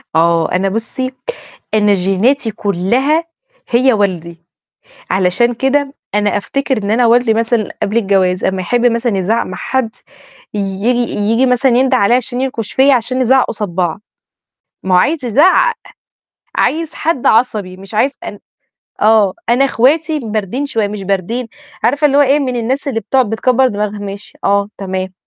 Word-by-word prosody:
آه، 165 0 +2
أنا 190 +2 +1
بُصّي، 230 +5 -3 0.6
أنا 210 -1 +3
جيناتي 205 +7 +1
كلّها 235 - 0 0.5
هي 255 +1 +3
والدي، 170 -5 -2 0.7
علشان 190 +6 +2
كده 275 +3 0 0.2
أنا 205 0 +1
أفتكر 270 +3 -2
إن 205 - -2
أنا 235 +2 +3
والدي 235 -1 +3
مثلًا 230 -1 0
قبل 205 +3 -1
الجواز، 195 -4 +1
أمّا 190 -1 -1
يحب 245 +6 +1
مثلًا 235 -3 +1
يزعق 215 +5 0
مع 185 - -7
حد، 260 -4 -1 0.6
ييجي 210 +5 -1
ييجي 225 +5 +1
مثلًا 250 +1 +2
ينده 260 0 +3
عليّا 235 +1 +3
عشان 250 0 -3
ينكش 235 -5 -3
فيّا، 275 +1 +4
عشان 255 +1 -1
نزعق 260 +1 +3
قصاد 210 -2 -4
بعض، 175 +1 -2 0.8
ما 185 -1 +1
هو - - +6
عايز 295 - 0
يزعق، 365 - +4 0.8
عايز 325 0 0
حد 315 -6 -2
عصبي، 215 -5 +1
مش 195 +3 -12
عايز 270 +6 +2
أن 205 - -7 0.6
آه، 215 -3 +4 0.2
أنا 250 +3 +4
أخواتي 305 +5 +1
باردين 220 +3 -3
شوية 220 -6 -1
مش 205 -1 -6
باردين، 200 +6 -2 0.4
عارفة 285 +6 +3
اللي 280 0 +1
هو - - +6
إيه؟ 285 +1 +3
من 255 -3 -2
الناس 255 +5 -2
اللي 225 -5 -1
بتقعد 250 +1 +1
بتكبر 255 +3 +2
دماغها. 210 -2 -3
"ماشي." 200 0 -8
"آه." 200 0 +1
"تمام." 190 -1 -4
225 Hz, 155 wpm, -15 LUFS, 200-260 Hz, 0.8 s, هو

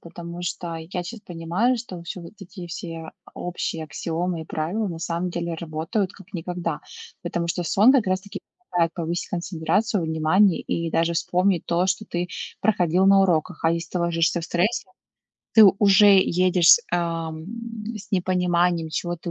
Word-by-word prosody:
потому 170 0 -9
что 170 -1 -4
я 170 +3 -5
щас 225 +3 -8
понимаю, 175 +8 0
что 230 -6 -7
вообще 170 +2 -7
вот 170 - -11
эти 180 -1 -9
все, 165 -1 -7
а, - - -17
общие 170 -2 -4
аксиомы 165 +2 -3
и - - -10
правила, 180 +8 -2
на 165 -2 -6
самом 170 +2 -2
деле, 170 -1 -3
работают, 165 +5 -2
как 195 - -16
никогда. 170 -2 -4 0.4
Потому 170 -1 -2
что 175 +1 -1
сон, 210 +9 +5
как 245 -8 +3
раз 185 0 +1
таки, 200 - -8 0.3
позволяет 170 -2 +1
повысить 170 0 -3
концентрацию 185 +4 -1
внимания 160 +5 +3
и 165 -1 -2
даже 165 +1 +1
вспомнить 180 +1 +1
то, 175 +2 +1
что 190 +3 -1
ты 175 -2 -3 0.3
проходил 185 -3 +2
на 195 0 +6
уроках. 160 -4 0
А 165 - +5
если 170 -1 -3
ты 180 - -2
ложишься 170 0 +1
в - - -5
стрессе, 190 +6 0 0.7
ты 220 - +8 0.2
уже 205 0 +6
едешь 180 -2 +4
с - - +6
ам 165 -2 -2 0.5
с 210 - -11
непониманием, 180 -3 +1
чего 175 +2 -3
ты 170 +1 -6
175 Hz, 170 wpm, -24 LUFS, 165-185 Hz, 0.7 s, ты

